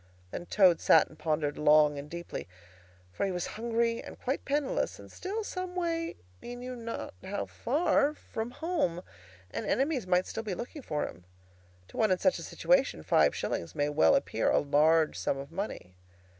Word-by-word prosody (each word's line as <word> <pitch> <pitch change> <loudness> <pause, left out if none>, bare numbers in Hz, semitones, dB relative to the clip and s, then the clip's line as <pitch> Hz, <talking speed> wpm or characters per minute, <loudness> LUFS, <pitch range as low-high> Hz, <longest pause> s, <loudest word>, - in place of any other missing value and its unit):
Then 175 - -6
Toad 185 -5 +5
sat 160 - +5
and 155 - -17
pondered 150 -2 -1
long 150 -1 +5
and 145 +1 -8
deeply. 170 +1 -6 0.7
For - - -2
he 195 - +1
was 180 -1 -2
hungry 230 +1 0
and - - -10
quite 265 +3 -2
penniless, 285 -1 0
and - - -13
still 415 +4 -4
some 365 -2 -5
way—he 330 - -4
knew 250 +1 -6
not 230 -1 -5
how 205 +1 -3
far—from 280 -5 0
home, 250 - -1 0.5
and - - -3
enemies 270 -6 +1
might 180 0 +3
still 225 - -4
be 210 -4 -4
looking 245 - -7
for 150 - -2
him. 90 +2 -12 0.6
To - - -12
one 220 - +3
in 185 - +3
such 280 - +2
a - - -7
situation, - - +1
five - - +4
shillings - - -3
may 145 - +1
very 145 - +1
well 80 - +5
appear - - +1
a - - +4
large 155 +2 +3
sum - - 0
of 140 +2 -8
money. 170 - -5
200 Hz, 180 wpm, -30 LUFS, -, 0.7 s, Toad